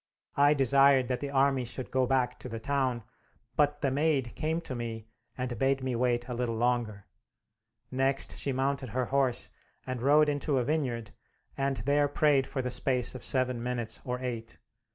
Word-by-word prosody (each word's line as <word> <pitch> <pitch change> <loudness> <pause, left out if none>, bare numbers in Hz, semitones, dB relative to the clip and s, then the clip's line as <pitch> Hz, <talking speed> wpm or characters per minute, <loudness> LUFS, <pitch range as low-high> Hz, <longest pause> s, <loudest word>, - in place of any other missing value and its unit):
I 145 +1 +5
desired 135 -1 +4
that 125 -1 -1
the 140 - -4
army 135 -1 +2
should 125 +1 -6
go 130 -1 +2
back 130 -1 0
to 125 - -8
the 115 -1 -5
town, 130 -1 -1 0.5
but 145 0 +2
the 135 - +1
Maid 140 -3 +1
came 160 +1 -1
to 145 - -6
me 115 -2 -5 0.3
and 125 -1 -4
bade 135 0 +1
me 130 -2 -1
wait 120 0 0
a 125 - -4
little 120 -1 -2
longer. 115 -4 -1 0.9
Next 135 +1 +1
she 140 - -1
mounted 135 0 -1
her 125 +3 -1
horse 135 -1 0 0.3
and 130 -2 -4
rode 150 +3 +5
into 145 -1 0
a 125 - +2
vineyard, 125 -6 -2 0.4
and 135 -1 -1
there 145 +1 +3
prayed 145 -2 +2
for 130 - -3
the 125 - -2
space 125 -1 +1
of 130 - -9
seven 125 -2 +1
minutes 120 -2 -3
or 125 0 -3
eight. 115 -3 -5
130 Hz, 180 wpm, -29 LUFS, 120-140 Hz, 0.9 s, I